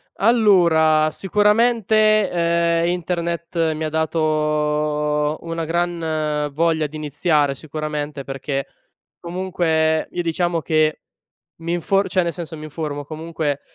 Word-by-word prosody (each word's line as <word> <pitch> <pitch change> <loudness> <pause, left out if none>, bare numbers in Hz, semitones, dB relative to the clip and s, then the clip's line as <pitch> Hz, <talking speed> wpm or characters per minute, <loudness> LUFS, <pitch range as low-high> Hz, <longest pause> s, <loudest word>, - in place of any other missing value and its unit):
Allora, 170 -9 +4
sicuramente, 215 +1 +3
ehm, 170 0 +1
internet 170 -1 -1
mi 155 +1 -4
ha 155 - -1
dato, 150 -1 0
una 165 0 -4
gran 160 -3 -1
voglia 160 0 +1
di 155 - -13
iniziare 150 -1 +1
sicuramente, 150 -1 -5
perché 135 0 -4 0.5
comunque 170 -3 0
io, 175 - -2
diciamo 170 0 0
che 155 -1 +1 0.6
mi 170 +1 -3
infor 195 +3 +1
cioè 185 - +2
nel 170 -1 -2
senso 165 -2 -7
mi 155 - -8
informo 150 -2 -5
comunque 155 -2 -3
160 Hz, 115 wpm, -21 LUFS, 150-175 Hz, 0.6 s, Allora